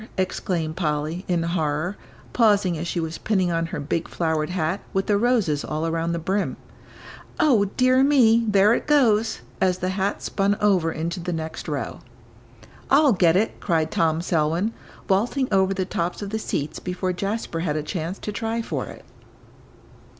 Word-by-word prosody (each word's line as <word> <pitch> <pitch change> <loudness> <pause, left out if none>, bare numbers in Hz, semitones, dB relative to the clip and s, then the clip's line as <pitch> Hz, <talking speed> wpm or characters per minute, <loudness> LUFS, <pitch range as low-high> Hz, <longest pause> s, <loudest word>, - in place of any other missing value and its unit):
exclaimed 170 -4 -1
Polly, 155 +1 -2
in 175 -2 +1
horror, 165 +1 -1 0.4
pausing 205 -6 +3
as 165 +2 -4
she 170 - -2
was 160 0 -4
pinning 190 -5 +1
on 165 0 0
her 165 - -5
big, 160 +3 -2
flowered 160 -2 -1
hat, 175 0 -1
with 195 0 0
the 205 - +2
roses 205 - +1
all 155 +1 -3
around 165 0 -1
the 170 - -1
brim; 190 +5 -1 0.8
"O 235 -9 +4
dear 255 +1 +4
me, 235 -5 +5
there 205 +1 +5
it - - -2
goes!" 230 - +3 0.2
as 185 -1 +2
the 185 0 -2
hat 195 +1 -2
spun 200 +1 0
over 185 -6 +2
into 170 +3 -3
the 175 +1 -3
next 160 -1 -5
row. 140 -6 -3 0.9
"I'll 280 -1 +5
get 175 -3 +4
it," 210 +4 0
cried 160 -4 0
Tom 160 0 +1
Selwyn, 170 +6 0 0.3
vaulting 235 +7 +1
over 190 -1 +3
the 190 -1 -1
tops 175 +2 -3
of 200 - -6
the 220 - -1
seats 150 -7 -3
before 185 0 -2
Jasper 195 -2 -3
had 165 -3 -1
a 155 - -1
chance 170 +3 -4
to 210 - -5
try 225 +2 -2
for - - -3
it. - - -11
185 Hz, 170 wpm, -23 LUFS, 165-210 Hz, 0.9 s, me